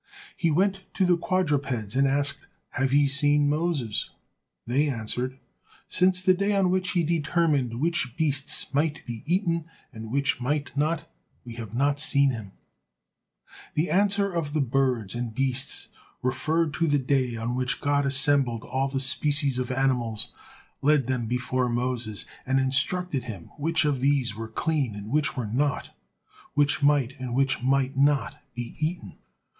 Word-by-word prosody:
He 170 - +1
went 195 +5 +1
to 190 - +2
the 180 -1 +4
quadrupeds 140 - -1
and 135 +1 +4
asked: 140 +1 -1 0.2
"Have 135 0 -1
ye 145 +1 +4
seen 145 +1 +2
Moses?" 145 -7 -1 0.6
They 140 +5 +1
answered: 125 +1 -3 0.5
"Since 185 0 +2
the 185 0 +5
day 200 +2 0
on 190 -2 +3
which 185 -1 0
he 175 - +2
determined 150 -6 +1
which 155 -6 -1
beasts 145 -2 0
might 155 +2 0
be 115 -3 -6
eaten, 170 -2 +1 0.3
and 110 0 -8
which 140 -1 0
might 145 +3 -2
not, 155 +3 0 0.4
we 120 - -8
have 115 -2 -7
not 140 +2 +1
seen 140 -2 +3
him." 110 -6 -7 1.2
The 155 +4 0
answer 200 0 +2
of 160 -4 -2
the 155 - +1
birds 130 -6 0
and 120 -2 -4
beasts 135 +1 0 0.3
referred 155 +5 0
to 165 - +1
the 145 -1 +3
day 130 -2 0
on 115 +2 -3
which 125 0 -1
God 145 0 +1
assembled 135 -4 +2
all 135 +1 -1
the 135 0 -2
species 140 0 +2
of 125 0 -2
animals, 125 -4 0 0.5
led 145 -2 +3
them 125 -2 -1
before 125 +1 0
Moses, 120 -3 -1 0.2
and 130 +1 +1
instructed 135 +2 0
him 100 -8 -8
which 165 +2 +1
of 145 -3 +1
these 135 -4 +1
were 115 0 -6
clean 140 -2 -1
and 105 +2 -7
which 145 -2 +1
were 125 - -1
not, 140 +7 -1 0.6
which 145 0 +2
might, 140 -2 +2
and 125 -2 -4
which 135 -1 +1
might 135 +1 +1
not 140 +1 +2 0.2
be 120 -1 -6
eaten. 160 +3 -3
140 Hz, 160 wpm, -26 LUFS, 125-155 Hz, 1.2 s, the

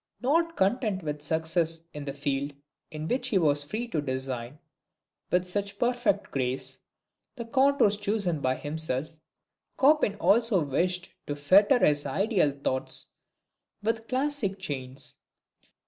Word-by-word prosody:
Not 330 +6 +1
content 200 -1 +1
with 150 -1 -4
success 160 +1 0
in 150 -1 -6
the 140 - -4
field 140 0 -2 0.3
in 155 0 -5
which 250 +4 0
he 210 - +2
was 145 -4 +3
free 220 +11 -4
to 160 -8 -1
design, 130 -1 -3 0.7
with 180 0 +2
such 200 +2 -3
perfect 240 -3 0
grace, 130 0 -2 0.6
the 235 -3 -6
contours 260 -4 +3
chosen 200 -6 -1
by 130 0 +1
himself, 155 0 -2 0.6
Chopin 275 -7 +4
also 210 -3 +3
wished 180 +6 -1 0.2
to 145 - -2
fetter 200 - +5
his 145 -1 +2
ideal 190 - +2
thoughts 130 0 -1 0.7
with 225 +1 -1
classic 260 -7 -1
chains. 135 -8 -5
180 Hz, 130 wpm, -28 LUFS, 145-220 Hz, 0.7 s, fetter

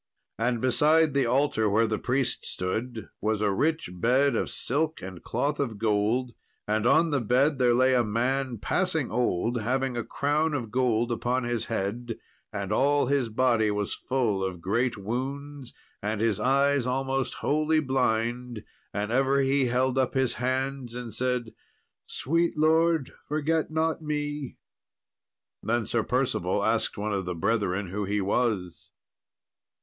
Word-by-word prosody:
And 120 +1 +1
beside 150 +5 +3
the 140 -3 +2
altar 130 -3 +2
where 110 +3 +3
the 110 -1 -1
priest 125 -1 -1
stood, 110 +5 -3
was 110 0 0
a 105 -1 +1
rich 155 - 0
bed 125 +8 +2
of - - -1
silk 155 +5 -1
and 95 -2 -8
cloth 140 +5 -1
of 120 -7 -2
gold; 110 +4 0 0.3
and 110 +2 +1
on 160 +5 +4
the 140 -3 +1
bed 130 +5 +2
there 120 -2 +4
lay 130 +1 +4
a 125 -1 +4
man 125 +3 -1
passing 160 - 0
old, 120 0 0
having 130 +3 -1
a 120 - -2
crown 150 +4 0
of 115 -6 -4
gold 120 -2 +1
upon 120 +2 0
his 120 -1 -1
head, 115 +2 -3 0.3
and 100 -1 -4
all 145 +4 +3
his 135 -3 +1
body 115 -1 +2
was 105 -1 -2
full 115 -7 -1
of 95 -2 -3
great 115 +7 0
wounds, 135 +5 -5 0.3
and 105 +1 -2
his 110 -3 +1
eyes 140 0 +2
almost 135 +1 -1
wholly 155 +1 +1
blind; 120 -4 -1 0.3
and 105 +1 -2
ever 135 +2 +3
he 135 0 +2
held 130 +2 +1
up 130 0 0
his 130 -2 +1
hands 130 -1 -2
and 120 -3 -6
said, 125 -1 -2 0.5
"Sweet 165 +4 0
Lord, 160 -1 +2
forget 155 +2 0
not 160 +1 0
me!" 150 -2 -3 1.0
Then 115 0 0
Sir 115 +2 0
Percival 110 -6 0
asked 110 0 0
one 105 +1 -2
of 95 -2 -2
the 90 0 -3
brethren 100 0 0
who 100 +2 -3
he 105 +2 -1
was. 100 -3 -1
125 Hz, 155 wpm, -27 LUFS, 110-140 Hz, 1.0 s, on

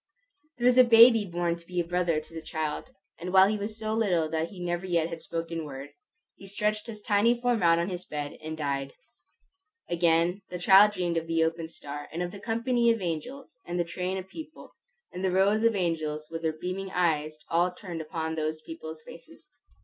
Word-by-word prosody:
There 240 - -2
was 250 0 +6
a - - +10
baby 230 -2 +7
born 175 -1 -1
to 170 0 -19
be 180 -1 -2
a - - +2
brother 175 -2 +1
to 155 - -15
the 165 - -6
child; 155 +7 -4 0.3
and 180 +1 -5
while 190 0 +7
he 215 +1 0
was 215 +2 -5
so 220 -1 -2
little 185 -8 +1
that 160 +1 -1
he 195 - -11
never 175 0 -2
yet 170 -2 +1
had 165 -1 -7
spoken 165 0 -4
word, 140 -1 -8 0.5
he 195 - -12
stretched 210 +2 -1
his 215 -2 -8
tiny 225 +4 +3
form 245 -2 +1
out 165 -1 +5
on 170 +1 0
his 180 -1 -5
bed 145 -3 -5
and 155 0 -6
died. 140 -2 -2 1.0
Again 170 +2 +2
the 180 - -5
child 195 +4 +7
dreamed 175 -3 -1
of 165 0 -2
the 165 0 +2
opened 165 0 -2
star, 145 -2 -8
and 170 +2 -3
of 175 - -4
the 200 - -9
company 235 +2 +1
of 230 -1 +2
angels, 180 - -5
and 175 0 -4
the - - +3
train 180 +3 -3
of 190 0 -6
people, 310 +8 -10 0.4
and 180 - -5
the 190 - +2
rows 195 +4 +3
of 230 -1 +4
angels 155 -4 -2
with 165 0 -4
their 160 -1 0
beaming 190 +2 -4
eyes 155 -4 0
all 175 +2 +2
turned 180 -2 -7
upon 160 0 -4
those 155 0 -2
people's 160 -1 -9
faces. 315 - -15
175 Hz, 210 wpm, -28 LUFS, 160-205 Hz, 1.0 s, a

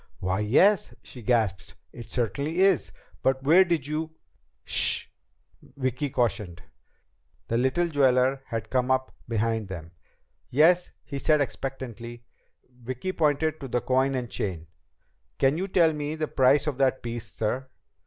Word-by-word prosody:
"Why, 95 +2 -1
yes," 170 - +3
she 125 - -10
gasped. 110 -6 0 0.2
"It 120 - -10
certainly 140 - -2
is. 195 -4 +3 0.3
But 130 0 +1
where 165 +7 +6
did 170 -6 -1
you 155 +2 -3 0.2
" - - -46
"Sh - - +3
h - - -34 0.5
h!" - - -20
Vicki 130 +2 -1
cautioned. 105 -8 -2 0.9
The 115 - +1
little 130 +8 +1
jeweler 135 -3 +2
had 115 -2 -5
come 125 0 +1
up 130 0 0 0.2
behind 115 -1 0
them. 85 -3 -8 0.6
"Yes?" 170 +6 +4
he 140 -2 -6
said 150 +2 +3
expectantly. 120 -4 -5 0.4
Vicki 125 +7 -5
pointed 155 -1 +1
to 135 - -6
the 125 -1 -1
coin 130 +1 +1
and 125 -2 -2
chain. 90 -8 -4 0.7
"Can 135 +2 +3
you 190 - -2
tell 170 -4 +3
me 150 0 -3
the 155 -1 -2
price 135 +2 +3
of 145 -4 -3
that 130 -1 +2
piece, 115 -2 -5
sir?" 125 +5 -2
130 Hz, 155 wpm, -26 LUFS, 115-150 Hz, 0.9 s, where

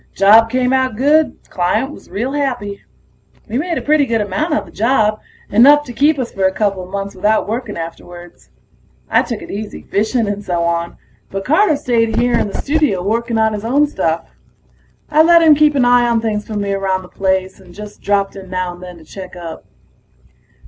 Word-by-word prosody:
Job 220 +3 +6
came 255 +1 +1
out 260 -3 +1
good; 295 +6 +2
client 185 +10 0
was - - -14
real 225 +8 -3
happy. 250 -9 -3 0.7
We 235 +3 -2
made 335 +1 -2
a - - -4
pretty 295 -2 +2
good 230 -1 0
amount 210 - -2
on 300 - 0
the - - -15
job, 215 -1 +1 0.3
enough 285 +7 +6
to 245 - -8
keep 295 +4 +2
us 255 -3 -3
for 195 -1 -1
a 190 - +3
coupla 195 -3 -2
months 200 0 -4
without 210 +3 +1
working 225 -1 -4
afterwards. 175 +1 -10 0.6
I - - +5
took 230 -3 -5
it - - -9
easy, 210 +1 -6
fishing 220 +2 0
and 205 0 -3
so 175 -3 -1
on, 170 0 -2 0.3
but 195 0 -5
Carter 315 +3 +3
stayed 230 -4 0
here 245 0 +1
in - - +1
the 200 - -5
studio 285 - 0
working 230 +3 -1
on 220 0 +2
his 210 0 -5
own 275 +6 +2
stuff. 165 - -2 0.8
I 305 +1 +5
let 335 +1 +6
him 315 -2 +7
keep 300 0 +3
an 260 -3 +3
eye 245 0 +4
on 230 -1 +2
things 215 -2 -3
for 215 - -6
me 200 -1 -1
around 190 -1 -1
the - - -12
place, 190 0 -2
and 185 -2 -16
just 210 +3 -11
dropped 200 -1 0
in 190 -1 -10
now 185 -1 -3
and 175 - -14
then 180 -1 -10
to 165 - -15
check 185 +4 -10
up. 170 -2 -8
215 Hz, 205 wpm, -17 LUFS, 190-260 Hz, 0.8 s, him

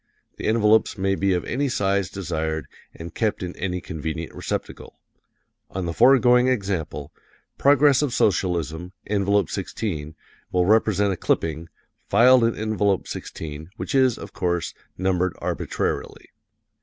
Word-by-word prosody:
The - - -4
envelopes 110 0 +3
may 95 0 +1
be 95 0 +1
of 90 - -1
any 140 +3 -1
size 100 -5 0
desired 80 -4 -3 0.3
and 80 0 -9
kept 110 -4 -1
in 90 0 -5
any 90 -1 -3
convenient 80 +1 -5
receptacle. - - -5 0.7
On 95 -1 -4
the 85 - -3
foregoing 125 +2 +5
example, 95 - -2 0.5
"Progress 140 0 +5
of 145 - +1
S., 100 -2 +3 0.6
Envelope 100 -2 +1
16," 80 -7 -4 0.4
will 90 -1 +2
represent 105 -1 +3
a - - -6
clipping, 80 0 -1 0.4
filed 125 +4 +6
in 115 0 +2
Envelope 105 -3 0
16, 80 0 -7
which - - -5
is, 130 -3 +3
of - - -10
course, 85 -2 -1 0.2
numbered 95 -1 0
arbitrarily. - - -3
95 Hz, 130 wpm, -23 LUFS, 85-110 Hz, 0.7 s, filed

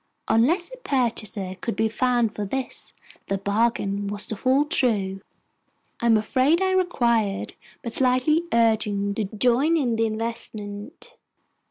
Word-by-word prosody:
Unless 330 - +2
a - - -8
purchaser 230 - -2
could 230 - -3
be 220 +2 +1
found 240 -1 +1
for 210 - -4
this, 260 +6 -5 0.4
the 195 - -1
bargain 200 0 0
was 205 +1 -3
to 220 - -4
fall 260 +7 +2
through. 205 -9 0 0.8
I 235 - 0
am 225 -1 +5
afraid 260 +9 +2
I 380 0 +1
required 235 - +1 0.3
but 235 - -5
slight 255 0 +3 0.2
urging 215 -3 +1
to 210 +1 -2
join 250 +10 +2
in 245 -7 0
the 225 0 +2
investment. 220 +2 -6
230 Hz, 140 wpm, -24 LUFS, 205-255 Hz, 0.8 s, am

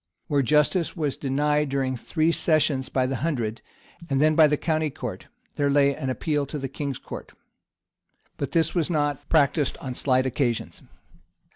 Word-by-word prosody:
[] - - -53
Where 145 -1 +3
justice 150 +6 +2
was 150 -4 -1
denied 150 +2 0
during 135 -1 -1
three 160 +6 0
sessions 155 -5 +1
by 130 -1 +1
the 130 0 -2
hundred, 120 -6 -2 0.5
and 135 -1 +1
then 155 +2 +4
by 155 0 +6
the 150 0 +1
county 155 -1 0
court, - - -7 0.3
there 145 -1 +2
lay 140 0 +4
an 135 -4 -4
appeal 145 +2 -1
to 150 - -5
the 135 -1 -3
king's 135 0 -4
court;[] - - -9 1.0
but 140 -1 -4
this 165 0 +2
was 170 -3 0
not 145 -3 -1
practised 145 -2 +2
on 130 -2 -6
slight 130 0 +2
occasions. 125 -2 -2
145 Hz, 170 wpm, -25 LUFS, 135-155 Hz, 1.0 s, by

